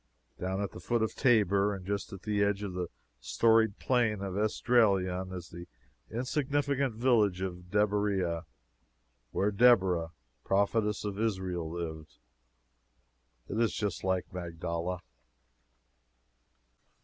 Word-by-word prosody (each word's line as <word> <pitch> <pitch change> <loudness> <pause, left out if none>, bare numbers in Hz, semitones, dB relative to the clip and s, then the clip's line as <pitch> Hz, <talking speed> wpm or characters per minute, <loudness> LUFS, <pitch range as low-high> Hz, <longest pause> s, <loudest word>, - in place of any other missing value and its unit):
Down 95 +1 -2
at 100 - -4
the - - -9
foot 115 +6 0
of 110 - -1
Tabor, 105 -5 +3
and 95 -2 -9
just 100 +1 -3
at 95 -1 -9
the 105 -1 +1
edge 100 0 0
of 100 -3 -4
the 90 -1 -3 0.3
storied 110 - +3
Plain 115 -6 +1
of 95 -2 -4
Esdraelon, 100 -4 +2
is 90 -2 -7
the 85 +1 -9 0.4
insignificant 140 +1 0
village 110 -6 +2
of 90 -1 -5
Deburieh, 100 -4 +1 0.9
where 100 +2 0
Deborah, 95 -7 +4 0.3
prophetess 105 +2 +1
of 100 -1 -3
Israel, 95 -6 -1
lived. 80 -2 -6 1.3
It 105 - -3
is 115 - +1
just 105 -5 -2
like 95 -2 -1
Magdala. 85 0 -4
100 Hz, 120 wpm, -30 LUFS, 90-110 Hz, 1.3 s, Deborah